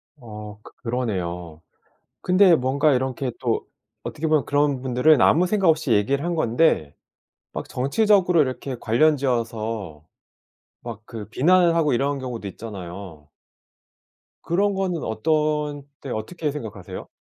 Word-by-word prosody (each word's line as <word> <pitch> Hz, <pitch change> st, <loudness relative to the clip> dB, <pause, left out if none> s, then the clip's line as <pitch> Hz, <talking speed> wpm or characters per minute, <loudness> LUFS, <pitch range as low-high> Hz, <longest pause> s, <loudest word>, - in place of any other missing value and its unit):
어. 105 Hz, -5 st, -10 dB
크 -, -, -13 dB
그러네요. 90 Hz, -9 st, -3 dB, 0.6 s
근데 185 Hz, 0 st, +5 dB
뭔가 140 Hz, +2 st, +2 dB
이렇게 130 Hz, 0 st, -1 dB
또 115 Hz, -3 st, -1 dB, 0.4 s
어떻게 160 Hz, +1 st, -4 dB
보면 155 Hz, -2 st, +2 dB
그런 145 Hz, -2 st, +1 dB
분들은 130 Hz, +4 st, +4 dB
아무 175 Hz, +3 st, +5 dB
생각 195 Hz, -1 st, +2 dB
없이 155 Hz, -6 st, +2 dB
얘기를 135 Hz, +8 st, +1 dB
한 175 Hz, 0 st, -1 dB
건데 120 Hz, -, +1 dB, 0.6 s
막 -, -, -6 dB
정치적으로 180 Hz, -, +3 dB
이렇게 130 Hz, 0 st, -4 dB
관련지어서 115 Hz, -, 0 dB, 0.8 s
막 115 Hz, -3 st, -7 dB
그 105 Hz, -3 st, -8 dB
비난을 170 Hz, +7 st, +4 dB
하고 155 Hz, -4 st, +2 dB
이런 140 Hz, +3 st, 0 dB
경우도 125 Hz, -6 st, -5 dB
있잖아요. 90 Hz, -6 st, -9 dB, 1.1 s
그런 200 Hz, +4 st, +1 dB
거는 185 Hz, -4 st, -2 dB
어떤 150 Hz, +3 st, 0 dB, 0.2 s
때 135 Hz, -, -7 dB
어떻게 150 Hz, +8 st, -3 dB
생각하세요? 100 Hz, -9 st, -7 dB
130 Hz, 285 characters per minute, -23 LUFS, 110-155 Hz, 1.1 s, 근데